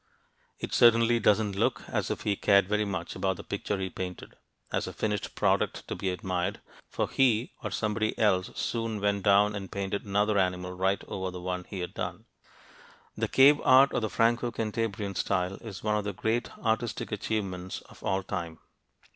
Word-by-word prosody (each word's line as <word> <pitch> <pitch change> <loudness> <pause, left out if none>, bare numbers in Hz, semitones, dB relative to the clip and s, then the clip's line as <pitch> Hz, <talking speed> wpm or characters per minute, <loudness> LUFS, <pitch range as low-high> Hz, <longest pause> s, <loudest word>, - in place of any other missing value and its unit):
It - - -6
certainly 115 0 +5
doesn't 105 -1 +2
look 110 +2 0
as - - -2
if - - -3
he 105 - 0
cared 100 -1 +4
very 105 +1 +1
much 90 -4 -4
about 95 -1 -1
the - - -8
picture 100 0 -3
he 95 -1 -3
painted 90 -1 -6 0.4
as - - -1
a - - -6
finished 105 -2 -2
product - - +1
to - - -3
be 95 - -2
admired 90 0 -2 0.3
for - - -1
he 125 -3 +2
or - - -3
somebody 110 0 -1
else 100 -2 +2
soon 115 -2 -2
went 100 0 +1
down 100 +2 +5
and 95 -1 -6
painted 100 0 -3
another 105 0 +1
animal 90 -1 0
right 95 +2 0
over 95 -1 -3
the 90 0 -7
one 90 0 -4
he 95 -3 -6
had 90 - -5
done. - - -5 0.9
The - - -1
cave 140 +2 +6
art 135 +2 +6
of - - 0
the 110 - -1
Franco 115 +5 +2
Cantabrian 110 -2 -2
style 95 0 -1
is 105 -6 -9
one 105 0 +1
of 105 - 0
the 100 - -2
great 115 +5 -1
artistic 110 0 -1
achievements 95 -4 -3
of - - -17
all 95 0 0
time. 85 -5 -4
100 Hz, 185 wpm, -28 LUFS, 95-110 Hz, 0.9 s, cave